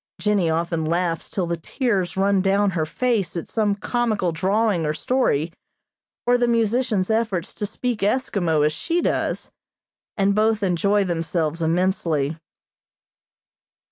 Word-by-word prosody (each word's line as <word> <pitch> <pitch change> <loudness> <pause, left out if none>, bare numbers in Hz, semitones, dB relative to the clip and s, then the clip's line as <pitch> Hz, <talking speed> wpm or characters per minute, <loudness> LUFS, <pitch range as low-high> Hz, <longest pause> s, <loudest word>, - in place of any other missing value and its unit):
Jennie 200 -5 +1
often 165 0 -1
laughs 170 +1 -1
till 185 - -1
the 170 0 -2
tears 190 - -1
run 195 0 +3
down 195 +1 +2
her 160 -3 -1
face 205 -4 -1
at 165 - -5
some 210 -3 +1
comical 215 -4 0
drawing 195 +2 +1
or 150 0 -1
story, 165 - 0 0.7
or 245 0 +3
the 240 - +2
musician's 230 -3 +1
efforts 220 -6 -1
to 205 - -3
speak 240 +1 -3
Eskimo 195 - +1
as 150 - +1
she 335 - -1
does, - - -1 0.7
and 200 0 +3
both 215 0 +2
enjoy 200 +3 +2
themselves 165 -2 -1
immensely. 165 -3 0
195 Hz, 135 wpm, -22 LUFS, 165-220 Hz, 0.7 s, run